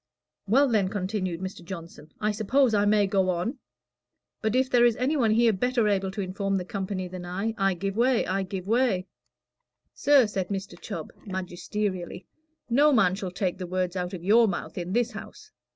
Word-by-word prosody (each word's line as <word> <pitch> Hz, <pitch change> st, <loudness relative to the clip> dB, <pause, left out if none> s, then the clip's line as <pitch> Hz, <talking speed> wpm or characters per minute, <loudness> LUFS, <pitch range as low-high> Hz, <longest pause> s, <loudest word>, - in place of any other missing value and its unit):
"Well, 270 Hz, +8 st, +4 dB
then," 210 Hz, -6 st, +2 dB
continued 185 Hz, -3 st, -3 dB
Mr. 185 Hz, -2 st, -6 dB
Johnson, 165 Hz, -4 st, -9 dB
"I 210 Hz, 0 st, +1 dB
suppose 230 Hz, +4 st, +2 dB
I 205 Hz, -1 st, +3 dB
may 205 Hz, 0 st, +4 dB
go 195 Hz, -1 st, +1 dB
on. 185 Hz, -, -2 dB, 0.8 s
But 220 Hz, +1 st, 0 dB
if 260 Hz, +1 st, +3 dB
there 245 Hz, -2 st, +4 dB
is 240 Hz, -2 st, +4 dB
any 260 Hz, +6 st, 0 dB
one 240 Hz, -6 st, +2 dB
here 225 Hz, +1 st, +4 dB
better 240 Hz, +2 st, +1 dB
able 195 Hz, -2 st, +1 dB
to 200 Hz, +2 st, -4 dB
inform 195 Hz, +1 st, -2 dB
the 180 Hz, -, -3 dB
company 190 Hz, -1 st, -4 dB
than 180 Hz, 0 st, -8 dB
I 185 Hz, +5 st, -2 dB
am, -, -, -3 dB
I 195 Hz, -1 st, +3 dB
give 195 Hz, +2 st, -3 dB
way 245 Hz, +1 st, +2 dB
I 195 Hz, +1 st, -1 dB
give 190 Hz, -1 st, -5 dB
way." 225 Hz, -4 st, +1 dB, 0.9 s
"Sir," 280 Hz, -3 st, +5 dB
said 195 Hz, -3 st, -3 dB
Mr. 195 Hz, 0 st, -4 dB
Chubb, -, -, -6 dB
magisterially, 185 Hz, 0 st, -4 dB, 0.4 s
"no 285 Hz, +5 st, +4 dB
man 220 Hz, -9 st, +4 dB
shall 190 Hz, -1 st, -4 dB
take 180 Hz, 0 st, -2 dB
the 180 Hz, -, -4 dB
words 185 Hz, 0 st, -2 dB
out 180 Hz, +1 st, -3 dB
of 170 Hz, -, -9 dB
your 225 Hz, +4 st, +5 dB
mouth 185 Hz, -, -4 dB
in 180 Hz, 0 st, -4 dB
this 240 Hz, +1 st, +1 dB
house. 420 Hz, -, -10 dB
195 Hz, 195 wpm, -26 LUFS, 185-230 Hz, 0.9 s, Sir